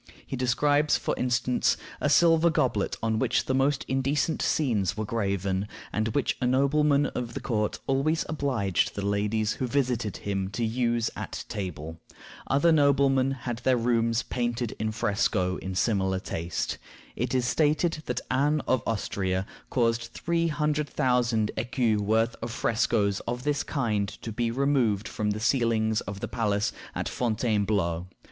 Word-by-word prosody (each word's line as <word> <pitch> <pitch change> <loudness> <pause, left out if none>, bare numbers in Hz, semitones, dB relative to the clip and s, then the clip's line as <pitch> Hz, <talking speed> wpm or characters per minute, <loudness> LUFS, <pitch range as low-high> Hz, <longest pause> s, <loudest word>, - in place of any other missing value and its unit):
He - - -4
describes, 145 +4 +2
for - - -2
instance, 125 0 +1 0.2
a - - +1
silver 170 0 +5
goblet 125 -10 0
on 110 -1 +1
which - - +1
the 130 - 0
most 135 +1 +1
indecent 135 +3 0
scenes 105 - +1
were 110 - -2
graven, 100 -3 -1 0.3
and 110 +1 0
which 145 - +1
a 125 - +2
nobleman 140 +2 +3
of 125 -3 -4
the - - -2
court 105 -3 -1
always 140 +4 +1
obliged 130 - 0
the 100 - -3
ladies 105 +2 0
who 130 - -3
visited 120 -5 0
him 95 -2 -2
to 115 +3 -1
use 115 0 0
at - - -6
table. 80 -5 -5 0.5
Other 145 +5 +3
noblemen 140 -3 +4
had 120 -3 -4
their 125 0 +2
rooms 115 -1 +1
painted 120 -1 -2
in 110 0 -1
fresco 100 -4 0
in 95 0 -5
similar 95 -2 +1
taste. 85 -2 -3 0.4
It - - -1
is 125 -1 +2
stated 155 +4 +1
that 125 0 -1
Anne 145 +3 +2
of 130 -2 +2
Austria 95 -4 -1 0.2
caused 115 -2 +1
three 170 0 0
hundred 150 -1 0
thousand 120 -4 +1
écus 115 -1 +1
worth 110 +3 +1
of 115 - -3
frescoes 110 -3 +1
of 120 +1 -3
this 145 0 0
kind 110 -8 -1 0.2
to 115 - -4
be 115 +2 -1
removed 120 -5 +1
from 105 -1 -2
the 105 +1 -1
ceilings 110 -2 +1
of 100 -1 -7
the - - -2
palace 105 -3 0 0.2
at - - -2
Fontainebleau. 105 -7 0
120 Hz, 155 wpm, -27 LUFS, 105-135 Hz, 0.5 s, silver